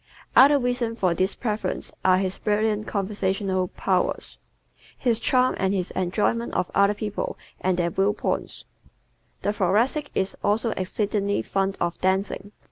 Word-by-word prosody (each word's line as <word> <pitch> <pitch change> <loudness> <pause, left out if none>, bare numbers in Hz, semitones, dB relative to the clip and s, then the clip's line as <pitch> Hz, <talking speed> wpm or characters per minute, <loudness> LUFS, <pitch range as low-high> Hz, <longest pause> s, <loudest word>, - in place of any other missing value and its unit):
Other 285 +2 +8
reasons 245 -3 -1
for 180 -3 +2
this 185 +3 0
preference 210 -5 -2
are 185 0 +5
his 190 0 -2
brilliant 215 0 0
conversational 195 -2 -1
powers, - - -1 0.6
his 235 -3 +1
charm 255 +1 +2
and 190 +1 +1
his 185 -2 -1
enjoyment 210 +6 -1
of 180 - -1
other 200 +1 +4
people 210 -1 -4 0.2
and 185 -1 0
their 170 -1 0
view 195 +4 +2
points. - - -3 0.8
The 205 - +1
Thoracic 230 - +1
is 190 - 0
also 220 +3 +1
exceedingly 200 +1 -1
fond 195 0 -1
of 175 0 -2
dancing. 190 +1 0
200 Hz, 140 wpm, -25 LUFS, 190-220 Hz, 0.8 s, Other